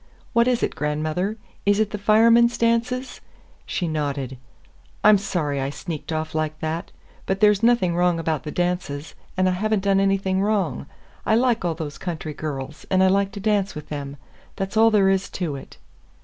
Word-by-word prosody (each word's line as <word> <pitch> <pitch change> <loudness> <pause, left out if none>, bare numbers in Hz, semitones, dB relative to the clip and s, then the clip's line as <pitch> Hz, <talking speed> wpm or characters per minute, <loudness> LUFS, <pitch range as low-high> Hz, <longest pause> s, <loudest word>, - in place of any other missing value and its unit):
"What 235 0 +4
is 250 -2 +1
it, - - 0
grandmother? 155 +7 -2 0.3
Is 205 +1 +3
it 215 -1 +1
the 210 - -4
Firemen's 230 +3 +5
dances?" 235 +2 0 0.5
She 175 - -2
nodded. 140 -4 -3 0.6
"I'm 210 -1 +7
sorry 150 -8 -2
I 135 - -1
sneaked 155 +2 -6
off 155 0 -3
like 155 -1 -2
that. 160 +1 -3 0.4
But 190 0 0
there's 210 -1 +4
nothing 230 -7 +3
wrong 175 -1 +2
about 160 -2 -1
the 155 - -7
dances, 175 -4 -2 0.2
and 185 0 +3
I - - +3
have 210 +4 -1
n't 195 - -2
done 195 -1 +3
anything 195 -1 +1
wrong. 195 -10 0 0.4
I 220 - +2
like 240 -1 +2
all 170 -2 0
those 145 -4 -6
country 160 -4 -4
girls, 145 -1 -6
and 190 0 +3
I 190 - +5
like 195 +1 +2
to 205 - -6
dance 205 -1 0
with 150 0 -8
them. 145 -1 -5 0.4
That's 195 +2 -4
all 225 +1 +6
there 205 -3 +4
is 195 0 0
to 165 -6 -3
it." 135 - -11
185 Hz, 190 wpm, -23 LUFS, 155-210 Hz, 0.6 s, I'm